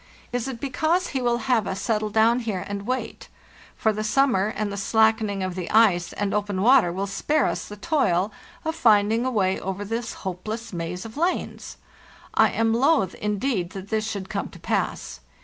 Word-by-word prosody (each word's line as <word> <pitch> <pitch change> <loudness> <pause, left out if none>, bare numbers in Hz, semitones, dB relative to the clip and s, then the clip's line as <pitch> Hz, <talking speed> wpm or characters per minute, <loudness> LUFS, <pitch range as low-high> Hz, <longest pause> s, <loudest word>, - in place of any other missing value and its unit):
Is 245 +1 -1
it 255 -3 -5
because 315 +7 0
he 265 - -2
will 240 -1 +2
have 240 -7 +2
us 190 - -3
settle 215 -1 0
down 225 +3 +3
here 215 -6 -3
and 200 +1 -5
wait, 255 +1 -3 0.5
for 220 -2 +1
the 215 +1 -3
summer 215 -3 +2
and 215 -1 -3
the - - -4
slackening 220 -1 +2
of 185 -1 -2
the 180 -1 -5
ice 200 -6 +4
and 205 -1 -2
open 205 -2 -1
water 245 -7 +5
will 190 +3 -2
spare 295 +10 0
us - - -2
the 210 - -8
toil 205 - +1 0.3
of 320 - 0
finding 225 -4 +3
a - - +2
way 190 -6 +1
over 195 +2 -4
this 230 +2 -3
hopeless 215 +5 -5
maze 175 +2 -4
of 225 +4 -9
lanes? 345 +4 -2 0.6
I - - +5
am 225 0 +1
loath, 245 - +3
indeed, 210 -3 -2
that 195 0 -8
this 220 0 -1
should 200 -3 -4
come - - -3
to - - -13
pass. 60 - -2
215 Hz, 190 wpm, -24 LUFS, 195-240 Hz, 0.6 s, water